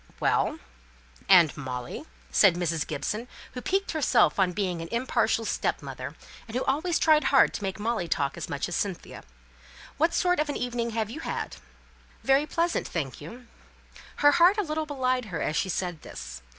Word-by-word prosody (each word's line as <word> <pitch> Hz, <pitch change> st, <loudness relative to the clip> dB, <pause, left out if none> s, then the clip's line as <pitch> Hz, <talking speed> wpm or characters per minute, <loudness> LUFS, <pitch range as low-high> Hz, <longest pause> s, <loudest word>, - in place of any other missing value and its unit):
"Well -, -, +1 dB, 0.7 s
and 175 Hz, -5 st, +7 dB
Molly," 130 Hz, -, -6 dB, 0.3 s
said 190 Hz, -5 st, +5 dB
Mrs. 170 Hz, -3 st, -1 dB
Gibson, 210 Hz, -, -3 dB, 0.2 s
who 250 Hz, -, -6 dB
piqued 390 Hz, +8 st, 0 dB
herself 270 Hz, -, +3 dB
on 185 Hz, -2 st, +3 dB
being 180 Hz, -2 st, -2 dB
an 165 Hz, -, -6 dB
impartial 235 Hz, -2 st, +1 dB
stepmother, -, -, -3 dB, 0.3 s
and 225 Hz, -, -8 dB
who 255 Hz, -, 0 dB
always 320 Hz, +5 st, +1 dB
tried 310 Hz, -3 st, +4 dB
hard 270 Hz, -, +5 dB
to -, -, -5 dB
make 195 Hz, +1 st, -3 dB
Molly 220 Hz, -4 st, -1 dB
talk 140 Hz, -3 st, 0 dB
as 170 Hz, -, -6 dB
much 140 Hz, -3 st, -2 dB
as 175 Hz, -, -4 dB
Cynthia, 195 Hz, -4 st, -4 dB, 0.8 s
"what 325 Hz, +4 st, +2 dB
sort 360 Hz, -2 st, +2 dB
of 300 Hz, 0 st, 0 dB
an 290 Hz, -, -2 dB
evening 240 Hz, -1 st, -2 dB
have 220 Hz, -1 st, -2 dB
you 305 Hz, -, -6 dB
had?" -, -, -4 dB, 0.7 s
"Very 270 Hz, +3 st, +3 dB
pleasant, 335 Hz, +3 st, 0 dB
thank 140 Hz, -7 st, -4 dB
you." 235 Hz, +12 st, -10 dB, 0.7 s
Her 290 Hz, 0 st, +5 dB
heart 345 Hz, +5 st, +5 dB
a 420 Hz, -, +1 dB
little 310 Hz, -2 st, -3 dB
belied 255 Hz, -3 st, 0 dB
her 185 Hz, -6 st, -5 dB
as 155 Hz, -, -1 dB
she 190 Hz, -, 0 dB
said 175 Hz, -3 st, -3 dB
this. -, -, -9 dB
230 Hz, 175 wpm, -27 LUFS, 175-290 Hz, 0.8 s, and